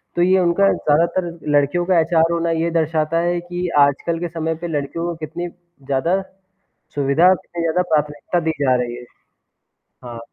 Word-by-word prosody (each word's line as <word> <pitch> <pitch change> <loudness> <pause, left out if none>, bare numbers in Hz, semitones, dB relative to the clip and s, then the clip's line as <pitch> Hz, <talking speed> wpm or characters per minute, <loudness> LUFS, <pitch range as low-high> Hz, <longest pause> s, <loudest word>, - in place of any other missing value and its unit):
तो 175 - +1
ये 185 +1 +4
उनका 185 +3 +3
ज़्यादातर 170 +4 +1 0.2
लड़कियों 145 +4 +2
का 180 -2 +3
एचआर 165 0 +2
होना 170 0 0
ये 165 +1 0
दर्शाता 160 0 0
है 175 +1 0
कि 175 +1 -4
आजकल 140 +4 +2
के 175 - -2
समय 160 -1 -3
पे 175 +2 -6
लड़कियों 155 +2 -3
को 175 - -3
कितनी 175 +3 -5 0.4
ज़्यादा 165 +8 0 0.7
सुविधा 145 +5 +3
और 185 - +6
कितनी 170 0 -7
ज़्यादा 165 +2 +1
प्राथमिकता 150 +3 0
दी 160 -1 -1
जा 130 -3 +3
रही 120 -1 -3
है। 125 - -10 1.0
हाँ। 120 -1 -8
165 Hz, 175 wpm, -20 LUFS, 150-175 Hz, 1.0 s, और